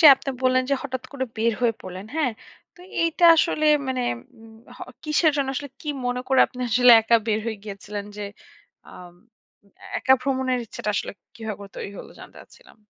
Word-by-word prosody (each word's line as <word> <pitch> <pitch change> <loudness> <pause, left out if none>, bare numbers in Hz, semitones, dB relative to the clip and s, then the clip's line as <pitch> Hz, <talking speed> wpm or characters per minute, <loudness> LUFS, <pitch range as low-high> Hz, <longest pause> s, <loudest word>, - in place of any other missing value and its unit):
যে 320 - +9
আপনি 270 - -5
বললেন 255 0 +3
যে, - - +4
হঠাৎ 260 -2 -4
করে 260 -2 -2
বের 230 +1 +2
হয়ে 235 -2 +2
পড়লেন। 185 +2 -8
হ্যাঁ? 290 -7 +1 0.4
তো 355 - -19 0.2
এইটা 335 +1 +1
আসলে 310 -1 +2 0.2
মানে, 255 -1 -1 0.4
উম 225 0 -15 0.2
হ - - -17 0.3
কিসের 305 +1 +3
জন্য 275 -1 0
আসলে 285 +2 -4
কি 300 - -8 0.2
মনে 245 0 -1
করে 265 -1 +4
আপনি 250 - -11
আসলে 245 +1 +6
একা 230 +1 +4
বের 215 -1 +1
হয়ে 225 -1 -2
গিয়েছিলেন? 205 0 -6
যে, 210 - -5 0.7
আম 175 -1 -12 0.8
একা 265 - +5
ভ্রমণের 260 -1 0
ইচ্ছাটা 210 - -4
আসলে - - -2 0.2
কিভাবে 215 -3 -6
তৈরি - - -5
হল, - - -9
জানতে - - -13
চাচ্ছিলাম। - - -19
250 Hz, 180 wpm, -24 LUFS, 220-275 Hz, 0.8 s, যে